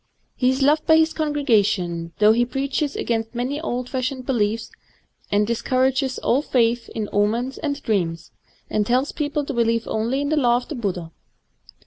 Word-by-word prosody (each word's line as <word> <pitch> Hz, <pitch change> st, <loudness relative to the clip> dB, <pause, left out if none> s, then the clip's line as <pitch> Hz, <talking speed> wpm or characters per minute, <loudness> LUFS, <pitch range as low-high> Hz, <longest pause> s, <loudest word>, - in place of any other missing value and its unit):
He 250 Hz, -, +2 dB
is 260 Hz, +1 st, +1 dB
loved 300 Hz, +2 st, +3 dB
by 320 Hz, -1 st, +7 dB
his 320 Hz, 0 st, +3 dB
congregation, 210 Hz, -, 0 dB
though 210 Hz, 0 st, +6 dB
he 235 Hz, +2 st, +3 dB
preaches 275 Hz, +3 st, -2 dB
against 225 Hz, 0 st, -2 dB
many 260 Hz, +5 st, -2 dB
old 250 Hz, -5 st, -3 dB
fashioned 255 Hz, 0 st, -3 dB
beliefs, 225 Hz, -3 st, -1 dB, 0.6 s
and 205 Hz, +1 st, +3 dB
discour 255 Hz, +3 st, +1 dB
ages 265 Hz, 0 st, -2 dB
all 265 Hz, -, +1 dB
^th 240 Hz, -4 st, +1 dB
in 215 Hz, -2 st, -4 dB
omens 230 Hz, +6 st, 0 dB
and 285 Hz, -2 st, -2 dB
dreams, 170 Hz, -6 st, -1 dB, 0.4 s
and 210 Hz, -, 0 dB
tells 250 Hz, +6 st, +1 dB
peo 295 Hz, -2 st, -2 dB
ple 295 Hz, 0 st, -2 dB
to 280 Hz, -, -4 dB
believe 230 Hz, -1 st, +1 dB
only 235 Hz, +5 st, -1 dB
in 285 Hz, -, -1 dB
the 310 Hz, -, +1 dB
Law 240 Hz, -4 st, +4 dB
of 245 Hz, -, -7 dB
the -, -, -4 dB
Buddha. 185 Hz, -, -3 dB
245 Hz, 180 wpm, -22 LUFS, 220-275 Hz, 0.6 s, by